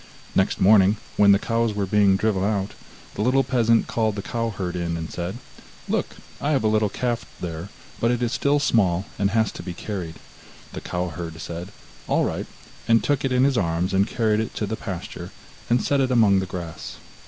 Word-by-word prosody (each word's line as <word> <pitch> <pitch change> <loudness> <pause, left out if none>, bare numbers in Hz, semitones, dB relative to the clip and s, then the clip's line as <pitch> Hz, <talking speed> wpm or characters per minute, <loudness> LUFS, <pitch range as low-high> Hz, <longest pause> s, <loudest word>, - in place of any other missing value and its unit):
Next - - +1
morning 100 +1 +5 0.2
when 100 -1 +6
the 100 - +6
cows 115 0 0
were 100 -1 0
being 100 0 +4
driven 100 -1 +1
out, 100 -1 0 0.4
the - - -4
little 130 +4 +3
peasant 115 -3 +3
called 110 -2 0
the 100 - -4
cow 115 -1 -2
herd 95 -4 -4
in 85 -1 -2
and 80 0 -6
said: 90 +5 -4 0.5
'Look, - - -1 0.3
I 150 +2 +1
have 135 - +1
a - - +3
little 110 -1 +2
calf 120 +2 -2 0.2
there, 85 +1 -5 0.3
but 115 - +2
it 120 0 0
is 120 - 0
still 140 +1 +2
small 100 -9 +2
and 100 0 +2
has 110 0 +1
to - - -8
be 90 -2 -6
carried.' 90 -5 -5 0.6
The - - -6
cow 90 0 -3
herd 80 0 -7
said: 85 +4 -6 0.4
'All - - +2
right,' - - -3 0.4
and 115 0 +4
took 145 -2 +1
it 135 - 0
in 125 0 +3
his 135 -3 +3
arms 85 +2 0
and 100 +2 +3
carried 110 -3 +1
it 110 - -3
to 105 - -1
the 110 +2 -3
pasture, 95 -6 -6 0.4
and 120 +1 +3
set 140 -1 +2
it 130 - +1
among 110 -6 +4
the 95 - -3
grass. 85 -3 -7
105 Hz, 210 wpm, -24 LUFS, 90-115 Hz, 0.6 s, when